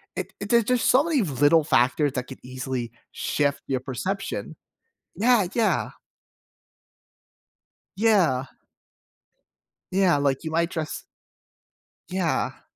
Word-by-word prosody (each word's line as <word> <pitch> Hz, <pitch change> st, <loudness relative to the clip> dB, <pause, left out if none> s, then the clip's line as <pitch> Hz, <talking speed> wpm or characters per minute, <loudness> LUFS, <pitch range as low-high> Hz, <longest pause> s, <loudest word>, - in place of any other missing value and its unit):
it -, -, -5 dB
it 200 Hz, -, -6 dB
there's 235 Hz, -1 st, +5 dB
just 250 Hz, -2 st, +2 dB
so 260 Hz, +3 st, +5 dB
many 315 Hz, -6 st, +1 dB
little 150 Hz, 0 st, +3 dB
factors 130 Hz, +2 st, +2 dB
that 125 Hz, -1 st, -3 dB
could 130 Hz, -, -10 dB
easily 130 Hz, -2 st, -4 dB, 0.2 s
shift 140 Hz, -1 st, -1 dB
your 130 Hz, -2 st, 0 dB
perception. 185 Hz, +10 st, -4 dB, 0.6 s
Yeah, 225 Hz, -3 st, +3 dB
yeah. 225 Hz, -3 st, +1 dB, 2.1 s
Yeah. 180 Hz, -, +3 dB, 1.5 s
Yeah, 185 Hz, -4 st, +3 dB
like, 140 Hz, -2 st, 0 dB
you 160 Hz, -, -4 dB
might 170 Hz, +2 st, +1 dB
dress 160 Hz, -3 st, -4 dB, 1.1 s
Yeah. 185 Hz, -3 st, -1 dB
160 Hz, 110 wpm, -25 LUFS, 135-200 Hz, 2.1 s, there's